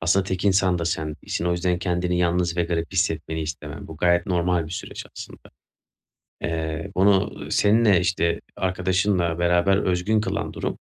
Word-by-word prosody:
aslında 90 +4 +2
tek 95 0 -3
insan 95 -2 +3
da 85 - -2
sen 80 -1 -1
değilsin. - - -4
O 85 - +1
yüzden 90 0 0
kendini 90 0 -1
yalnız 85 0 +1
ve 85 - +2
garip 85 -2 -2
hissetmeni 80 0 -1
istemem. 75 -1 -6
Bu 80 - -9
gayet 85 +3 +2
normal 90 -3 +1
bir - - -10
süreç 90 - -6
aslında. - - -9 1.0
Eee, 80 +2 -3
onu, 95 +1 +3
ııı, - - -7
seninle 105 -3 +4
işte, 85 -2 0
arkadaşınla 95 -2 0
beraber 90 +3 +3
özgün 95 +4 +1
kılan - - -3
durum, - - -3
90 Hz, 165 wpm, -24 LUFS, 85-95 Hz, 1.0 s, seninle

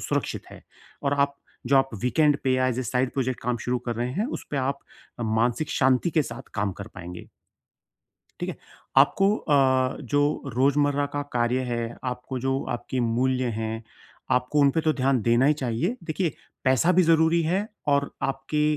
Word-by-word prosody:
सुरक्षित - - -2
है - - -12 0.4
और 140 0 +1
आप 140 0 -20 0.3
जो 135 +3 +4
आप 135 0 +4
वीकेंड 145 +3 +3
पे 130 - +3
एज़ 130 0 -1
ए - - -1
साइड 125 +2 0
प्रोजेक्ट 130 -2 -2
काम 125 +1 -1
शुरू 125 0 +1
कर 120 - -1
रहे 120 +1 -1
हैं 205 - -1
उस - - -12
पे 145 - -2
आप 140 +1 0 0.4
मानसिक 120 +5 0
शांति 130 +5 +2
के 155 -2 +2
साथ 120 +1 -7
काम 100 -2 0
कर 100 - -6
पाएँगे। 90 -1 -9 1.1
ठीक - - -2
है, - - -4 0.4
आपको 195 +9 +5
अ, 130 -3 +2
जो 145 +2 0
रोज़मर्रा 145 +2 +2
का 145 0 -1
कार्य 120 +1 +1
है, 115 0 -3
आपको 125 +1 -4
जो 135 +2 -1
आपकी 130 +1 -4
मूल्य 125 +2 +1 0.2
हैं, 110 +1 -3 0.6
आपको 125 +4 -3
उन 140 -1 +6
पे 160 - 0
तो 155 0 +2
ध्यान 135 -3 +1
देना 120 +3 +3
ही 150 - +5
चाहिए 130 - -1
देखिए 165 -1 -1 0.3
पैसा 130 +7 +4
भी 185 +1 +5
ज़रूरी 165 0 +4
है 185 +6 0 0.2
और 140 0 +2 0.2
आपकी 150 +2 -2
130 Hz, 180 wpm, -25 LUFS, 125-145 Hz, 1.1 s, उन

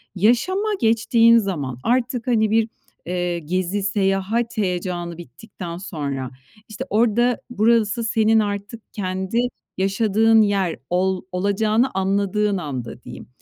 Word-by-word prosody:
yaşama 245 - +2
geçtiğin 230 +1 +4
zaman 150 - -2
artık, 245 0 0
hani, 220 -3 +2
bir, 225 0 +2 0.4
eee, 175 0 -2
gezi, 185 +5 -2
seyahat 200 +4 0
heyecanı 180 -3 -2
bittikten 175 - -9
sonra, 140 -8 -4 0.4
işte, 215 - -6
orada, 235 +3 +2
burası 230 0 +2
senin 220 0 +3
artık 205 +1 -3
kendi 190 +2 -3 0.4
yaşadığın 215 +3 +3
yer 195 -5 +1
ol 185 +1 +1
olacağını 210 +6 +1
anladığın 200 +2 0
anda 130 -8 -6
diyeyim, - - -10
200 Hz, 110 wpm, -21 LUFS, 180-225 Hz, 0.4 s, geçtiğin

